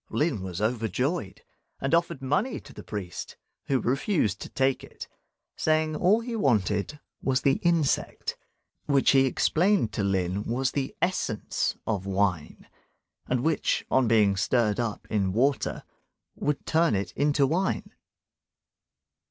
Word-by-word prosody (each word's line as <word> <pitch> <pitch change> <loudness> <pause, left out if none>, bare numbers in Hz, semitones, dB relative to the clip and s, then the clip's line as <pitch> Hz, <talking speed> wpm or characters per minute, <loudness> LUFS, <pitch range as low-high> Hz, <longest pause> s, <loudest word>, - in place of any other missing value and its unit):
Lin 150 - 0
was 95 0 -5
overjoyed, 115 - -1 0.4
and 135 +3 -2
offered 170 -4 +1
money 150 - 0
to - - -14
the - - -9
priest, 95 -5 -6 0.3
who 135 -2 +2
refused 125 - 0
to - - -6
take 135 0 0
it, - - -10 0.5
saying, 155 0 +1
all 195 +8 +3
he 235 0 -4
wanted 110 - +1 0.2
was 130 0 +1
the 135 - +3
insect, 170 -5 0 0.5
which 140 -2 +4
he 135 -1 +5
explained 170 - +2
to 105 - -1
Lin 95 0 0
was 130 +3 0
the 140 +7 -3
essence 175 - -1
of 100 -3 -2
wine, 95 -5 -1 0.6
and 125 -1 0
which, 160 -1 +1
on 130 -2 +3
being 105 -3 +4
stirred 110 +2 +1
up 115 -3 -3
in 100 -4 +1
water, 135 +6 0 0.5
would 150 -1 -2
turn 160 -7 +2
it 95 -2 -2
into 145 +4 +2
wine. 175 +7 -1
130 Hz, 135 wpm, -27 LUFS, 105-155 Hz, 0.6 s, he